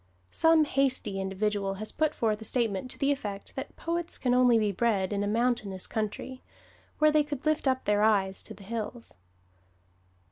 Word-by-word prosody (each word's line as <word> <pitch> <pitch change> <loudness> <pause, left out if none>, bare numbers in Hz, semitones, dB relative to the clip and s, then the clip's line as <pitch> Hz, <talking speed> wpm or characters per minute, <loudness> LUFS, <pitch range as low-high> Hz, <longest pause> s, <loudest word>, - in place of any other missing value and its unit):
Some 325 -1 +4
hasty 260 -9 0
individual 195 0 -1
has 215 +2 -5
put 310 -1 0
forth 220 -2 0
a - - -5
statement 225 -1 -1
to - - -4
the 280 0 +2
effect 205 -8 -5
that 265 - -6
poets 340 0 -3
can 250 -2 +1
only 250 -2 +5
be 210 -2 +1
bred 200 -2 0
in 200 0 0
a - - -1
mountainous 215 -4 0
country, 220 +4 -4 0.6
where 305 0 +5
they 300 0 +4
could 290 -1 -6
lift 310 -2 +1
up 260 0 +1
their 205 0 +2
eyes 195 -3 +2
to - - -10
the 200 - -14
hills. 230 +2 -6
225 Hz, 180 wpm, -28 LUFS, 205-265 Hz, 0.6 s, only